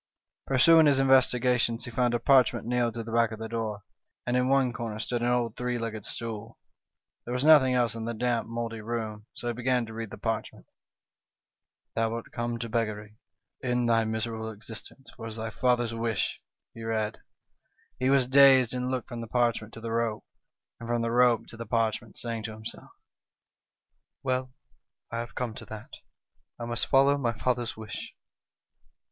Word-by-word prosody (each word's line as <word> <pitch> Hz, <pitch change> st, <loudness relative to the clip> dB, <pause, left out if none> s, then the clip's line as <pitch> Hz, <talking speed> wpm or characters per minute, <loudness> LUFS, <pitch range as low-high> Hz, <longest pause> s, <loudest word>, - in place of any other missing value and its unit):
Pursuing 160 Hz, +4 st, +6 dB
his 140 Hz, -2 st, +4 dB
investi 130 Hz, -2 st, +5 dB
gations, 120 Hz, -1 st, +1 dB
he 120 Hz, -, -7 dB
found 120 Hz, 0 st, +1 dB
a -, -, +1 dB
parchment 130 Hz, -2 st, +4 dB
nailed 120 Hz, -1 st, 0 dB
to 115 Hz, -, -3 dB
the 115 Hz, -, -8 dB
back 115 Hz, -1 st, +3 dB
of 110 Hz, -, -5 dB
the 110 Hz, +1 st, -5 dB
door, 110 Hz, -3 st, -3 dB, 0.4 s
and 120 Hz, -, 0 dB
in 125 Hz, 0 st, +2 dB
one 135 Hz, -2 st, +3 dB
corner 115 Hz, -3 st, -4 dB
stood 120 Hz, +2 st, -2 dB
an 120 Hz, -, +1 dB
old 120 Hz, -2 st, +1 dB
three 125 Hz, 0 st, -2 dB
legged 110 Hz, -3 st, -4 dB
stool. 115 Hz, -1 st, -6 dB, 0.7 s
There 120 Hz, -, -7 dB
was 125 Hz, -, 0 dB
nothing 145 Hz, -5 st, +7 dB
else 120 Hz, -3 st, +2 dB
in 115 Hz, -1 st, -5 dB
the 115 Hz, 0 st, -3 dB
damp, 120 Hz, 0 st, 0 dB
mouldy 115 Hz, -1 st, -4 dB
room, 110 Hz, -1 st, -4 dB
so -, -, -8 dB
he -, -, -1 dB
began 125 Hz, 0 st, +1 dB
to 110 Hz, -, -10 dB
read 115 Hz, -1 st, -5 dB
the -, -, -9 dB
parchment. 110 Hz, -1 st, -3 dB, 0.4 s
" -, -, -65 dB
' -, -, -62 dB
Thou 115 Hz, 0 st, +1 dB
art 115 Hz, -, -7 dB
come 120 Hz, 0 st, -2 dB
to 115 Hz, 0 st, -4 dB
beggary; 110 Hz, -1 st, -3 dB, 0.4 s
end 125 Hz, -1 st, +1 dB
thy 115 Hz, -1 st, +4 dB
miserable 110 Hz, 0 st, -3 dB
existence, 110 Hz, +5 st, -9 dB
for 115 Hz, -, -10 dB
it -, -, -4 dB
is 110 Hz, -, -6 dB
thy 110 Hz, 0 st, -4 dB
father's 120 Hz, -1 st, +1 dB
wish,' 115 Hz, -2 st, -1 dB, 0.3 s
he 115 Hz, -, -10 dB
read. 110 Hz, -1 st, -2 dB, 0.4 s
" -, -, -40 dB
He 130 Hz, -, +2 dB
was 135 Hz, -2 st, +4 dB
dazed, 130 Hz, -2 st, +7 dB
and 125 Hz, 0 st, -2 dB
looked 130 Hz, 0 st, -3 dB
from 120 Hz, -2 st, -5 dB
the 115 Hz, -, -6 dB
parchment 115 Hz, -2 st, 0 dB
to 115 Hz, -, -9 dB
the 115 Hz, 0 st, -4 dB
rope, 115 Hz, -2 st, -1 dB, 0.5 s
and 115 Hz, -, -8 dB
from 120 Hz, -1 st, +1 dB
the 115 Hz, -, -1 dB
rope 120 Hz, -1 st, +4 dB
to 115 Hz, -, -11 dB
the 115 Hz, -, -7 dB
parchment, 115 Hz, -1 st, -1 dB
saying 115 Hz, -2 st, -4 dB
to 110 Hz, -, -5 dB
himself: 110 Hz, +1 st, -9 dB, 1.3 s
'Well, 130 Hz, -1 st, -1 dB, 0.6 s
I 115 Hz, -, -2 dB
have 120 Hz, 0 st, -6 dB
come 120 Hz, -3 st, -2 dB
to -, -, -9 dB
that, 110 Hz, -1 st, -10 dB, 0.7 s
I 120 Hz, -, -4 dB
must 120 Hz, 0 st, -2 dB
follow 140 Hz, +1 st, +4 dB
my 120 Hz, -3 st, 0 dB
father's 120 Hz, 0 st, -1 dB
wish.' 110 Hz, -1 st, -7 dB
115 Hz, 195 wpm, -28 LUFS, 115-125 Hz, 1.3 s, nothing